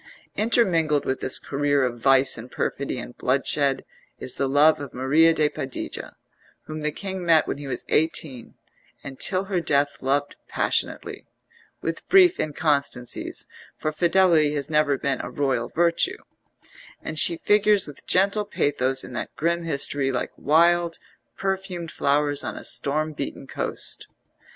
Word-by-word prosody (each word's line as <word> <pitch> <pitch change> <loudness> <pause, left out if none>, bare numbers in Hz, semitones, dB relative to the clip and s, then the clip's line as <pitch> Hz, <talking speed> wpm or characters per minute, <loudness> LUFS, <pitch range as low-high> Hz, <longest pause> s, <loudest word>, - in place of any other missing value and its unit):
Intermingled 175 - +2
with 130 - -1
this 130 - 0
career 145 0 0
of 120 -1 -4
vice 135 +2 +4
and 120 +2 -9
perfidy 140 0 -3
and 120 0 -8
bloodshed 135 +1 0 0.3
is 130 - -4
the 135 - -1
love 150 +3 +4
of 140 -3 -8
Maria 145 +6 +4
de 155 -2 +2
Padilla, 135 -3 -6 0.5
whom 155 0 -7
the 150 0 -1
king 190 +2 -5
met 165 -2 +4
when - - -3
he 145 - -7
was 125 -2 -5
eighteen, 150 -5 -1 0.5
and 135 -1 -9
till 185 0 +2
her 190 -2 -1
death 145 -2 +1
loved 140 +2 -1
passionately - - -1 0.6
with - - -4
brief 370 -2 +6
inconstancies, 145 -5 -2 0.3
for 155 - -2
fidelity 165 -2 +3
has 145 +1 -4
never 150 -2 +2
been 135 -1 -2
a - - -6
royal 130 -2 -1
virtue; 170 0 +1 0.9
and 155 - -2
she 170 - +5
figures 210 +2 +3
with 145 -2 -11
gentle 200 +3 +2
pathos 135 -9 -1
in - - -10
that - - -5
grim 170 +1 -1
history 140 -3 +1
like 125 - -3
wild 170 +2 +2 0.4
perfumed 190 -4 -3
flowers 145 0 +1
on - - -5
a - - -8
storm 155 +2 +2
beaten 140 -1 -6
coast. - - -3
150 Hz, 150 wpm, -24 LUFS, 135-170 Hz, 0.9 s, brief